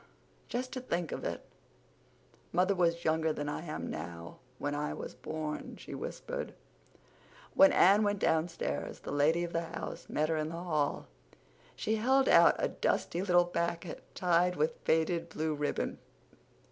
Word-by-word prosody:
"Just 255 +1 -3
to 255 - -4
think 175 -9 -2
of - - -4
it—mother 185 +3 -5
was 170 -2 +1
younger 160 0 +2
than 145 -1 -3
I 150 - -3
am 155 -2 -5
now 85 +1 -7 0.2
when 145 +2 -2
I 150 +1 -2
was - - -6
born," 155 -1 -5
she - - -9
whispered. - - -5 1.0
When 290 0 +7
Anne 200 +3 +6
went 205 -1 +1
downstairs 160 - -1
the - - -6
lady 155 +4 +3
of 170 - -4
the 165 - +1
house 165 - -7
met 155 +1 0
her 160 - +1
in 155 0 -1
the 165 - -6
hall. 155 -4 -1 0.7
She 220 +1 0
held 265 +4 +3
out - - +7
a - - +1
dusty 175 - 0
little 175 -2 +4
packet 170 0 -3
tied 180 0 +3
with 155 +1 0
faded 165 +1 +1
blue 160 -1 -1
ribbon. 150 0 -2
170 Hz, 155 wpm, -32 LUFS, 155-180 Hz, 1.0 s, When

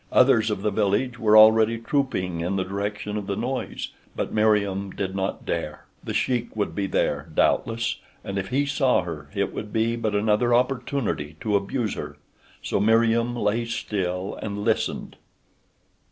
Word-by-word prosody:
Others 120 -4 +5
of 105 -2 -3
the 105 - +1
village 110 +5 0
were 110 -1 +5
already 110 +1 +7
trooping 115 - -1
in 90 +4 -1
the 95 - 0
direction 105 +2 -3
of 100 -2 -5
the 100 - -1
noise. 125 +5 -3 0.3
But - - -3
Meriem 100 -2 +2
did 95 0 -4
not 95 0 -3
dare. - - -3 0.2
The - - -4
Sheik 120 -3 0
would 105 -2 -1
be 100 -1 -1
there, 80 -3 -1
doubtless, 115 +8 +1 0.3
and 100 0 -3
if 95 - -4
he 135 +3 +1
saw 135 - +2
her 75 -5 -7
it - - -1
would 105 - -6
be 115 +1 +1
but 110 -3 -1
another 110 +3 +3
opportunity 125 - -1
to 105 -2 0
abuse 105 +2 -1
her, - - -7 0.5
so - - 0
Meriem 115 +3 +3
lay 115 0 0
still 95 -4 -3
and 105 -1 -4
listened. 110 0 -1
105 Hz, 165 wpm, -24 LUFS, 100-115 Hz, 0.5 s, already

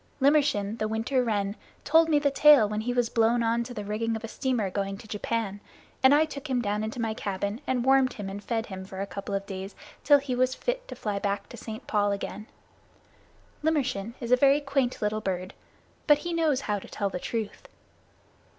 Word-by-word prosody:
Limmershin, 275 -7 +2
the 215 - 0
Winter 225 +4 0
Wren, 205 -3 -1 0.3
told 325 +2 +4
me 305 - +4
the 290 -1 +2
tale 285 -5 +7
when 210 +1 -2
he 245 +3 -2
was 245 -1 +1
blown 230 +1 +2
on 230 +1 +1
to 250 - -9
the 210 -4 -5
rigging 225 +2 -1
of 220 - -6
a - - -4
steamer 225 -5 -1
going 195 0 -2
to 215 - -13
Japan, 210 -1 -2 0.4
and 265 - +7
I 300 +2 +5
took 285 -1 -8
him 255 -2 +1
down 210 -2 -1
into 220 +2 -4
my 225 -1 -1
cabin 200 +2 -3
and 250 -2 0
warmed 265 -1 +4
and 200 0 -6
fed 225 -2 -1
him 190 -2 -7
for 190 0 -9
a 195 - -1
couple 200 0 -5
of 195 0 -3
days 195 0 -7 0.3
till 290 +1 +7
he 275 -2 -3
was 255 +1 +1
fit - - -3
to - - -7
fly 205 -2 -3
back 200 0 -2
to - - -9
St. 220 0 -8
Paul's 205 -1 +1
again. 200 +2 -7 1.2
Limmershin 250 -8 0
is 235 -1 -5
a - - +8
very 275 +2 +4
quaint 275 -5 -1
little 215 +1 0
bird, 185 -1 -3 0.5
but 295 -2 +7
he 345 +3 -4
knows 315 -5 +2
how 205 -4 -1
to - - -12
tell 200 -2 -2
the 180 - -3
truth. 220 +2 -4
225 Hz, 215 wpm, -27 LUFS, 205-265 Hz, 1.2 s, a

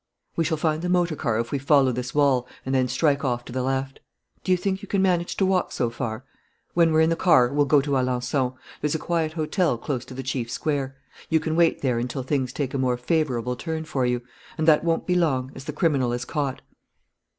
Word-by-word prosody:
"We 165 - +1
shall 160 0 0
find 155 0 0
the 180 - -2
motor 175 -2 +2
car 115 -7 -1
if 115 - -3
we 140 - 0
follow 140 -1 +4
this 125 +2 -4
wall 135 -4 +3 0.2
and 130 - -2
then 130 -1 +2
strike 145 +1 +1
off 120 -2 -1
to - - -9
the 130 - -1
left.... 135 +1 -2 0.4
Do 185 - -1
you 185 - +5
think 190 +1 -2
you 200 - -9
can 200 - 0
manage 180 -2 +1
to 195 - +3
walk 185 -1 +1
so 120 -2 -1
far?... 115 +1 -4 0.5
When 170 -1 +4
we're 160 0 +4
in 160 +1 +3
the - - +2
car, 150 -8 +4
we'll 145 0 +2
go 145 0 +5
to 145 +1 -4
Alençon. 130 0 0 0.3
There's 150 +1 0
a - - +2
quiet 160 -1 -1
hotel 160 - 0
close 125 0 -3
to 130 - -10
the 135 - -5
chief 130 -2 -3
square. 135 -1 -2 0.3
You 160 - +3
can 160 0 -2
wait 165 -3 +3
there 125 -3 +1
until 125 +2 -3
things 130 -2 -1
take 135 -1 -3
a 135 - -1
more 125 -1 +1
favourable 125 -4 0
turn 160 +4 -4
for 135 -4 -1
you 125 0 -1 0.3
and 155 - -1
that 155 -1 +5
won't 165 -1 0
be 180 - +1
long, 135 -7 +1
as 135 - -10
the - - -3
criminal 140 -6 +1
is 120 0 -3
caught." 140 -4 -3
140 Hz, 240 wpm, -24 LUFS, 125-160 Hz, 0.5 s, you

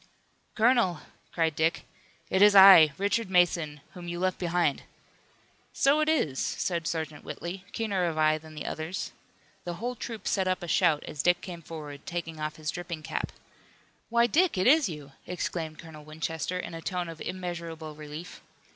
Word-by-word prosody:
"Colonel," 225 -8 +3 0.3
cried 160 -3 0
Dick, 160 +2 0 0.5
"it 190 - +2
is 205 0 +7
I, 190 -6 +10
Richard 205 +1 0
Mason, 170 -5 +2
whom 175 -1 -9
you 175 0 -4
left 185 0 0
behind!" 170 -5 +1 0.9
"So 280 +2 +3
it 310 0 +2
is," 155 - +1
said 170 -2 -1
Sergeant 155 -2 -4
Whitley, 180 +2 -6
keener 200 -5 -1
of 165 -2 -2
eye 155 0 +3
than 155 0 -13
the 150 - -6
others. 160 +4 -4 0.5
The 175 -1 -4
whole 240 +7 -3
troop 230 -2 -7
set 190 -2 +1
up 185 0 -1
a - - -5
shout 150 -2 +3
as 145 - -4
Dick 175 +2 +3
came 175 -2 -8
forward, 150 -3 -8
taking 165 -2 -4
off 155 0 -3
his 155 -1 -3
dripping 175 -3 -6
cap. - - -3 0.8
"Why, 235 0 +4
Dick, 320 - +2
it 185 - +1
is 295 -4 +5
you!" 150 -4 -8 0.2
exclaimed 165 -3 -4
Colonel 160 -3 -11
Winchester 160 +3 -4
in 180 - -5
a 165 - -6
tone 180 0 -3
of 165 -1 -9
immeasurable 170 -4 -5
relief. 150 +4 -9
170 Hz, 175 wpm, -28 LUFS, 155-190 Hz, 0.9 s, I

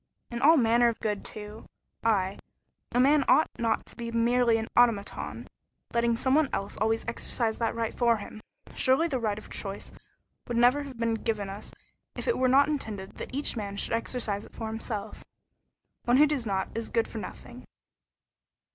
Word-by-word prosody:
"And 235 0 -4
all 320 +4 +7
manner 235 -1 +4
of 230 - -1
good, 210 -2 -2
too. 210 +1 -6 0.4
I 195 -4 +1 0.5
a 245 - +1
man 280 +3 +5
ought 315 - +4
not 230 -1 0
to - - -8
be 235 -1 -5
merely 235 0 +3
an 220 0 -3
automaton, 230 -5 +1 0.5
letting 235 0 +2
some 260 +2 +1
one 300 -1 +4
else 195 +1 -3
always 225 +1 0
exercise 230 -1 -1
that 230 -1 0
right 230 -1 -2
for 235 -2 +3
him. 215 +1 -9 0.3
Surely 265 +6 +3
the 270 -6 -1
right 215 -3 -1
of 215 - -11
choice 195 -1 -3 0.6
would 240 -2 -2
never 245 +4 +5
have 275 -4 -8
been 230 0 0
given 215 -3 -2
us 200 - -8 0.4
if - - -6
it 475 - +1
were 260 - +3
not 275 +3 +5
intended 220 -10 -4
that - - -7
each 280 +1 -2
man 200 -3 -4
should - - -1
exercise 230 -3 -2
it - - -15
for 225 - -5
himself. 220 -1 -5 0.8
One 245 +1 +4
who 300 - +7
does 280 -6 -1
not 190 -1 -1
is 230 0 -3
good 230 -1 +1
for 225 - -6
nothing." 245 +3 -9
230 Hz, 185 wpm, -28 LUFS, 215-250 Hz, 0.8 s, all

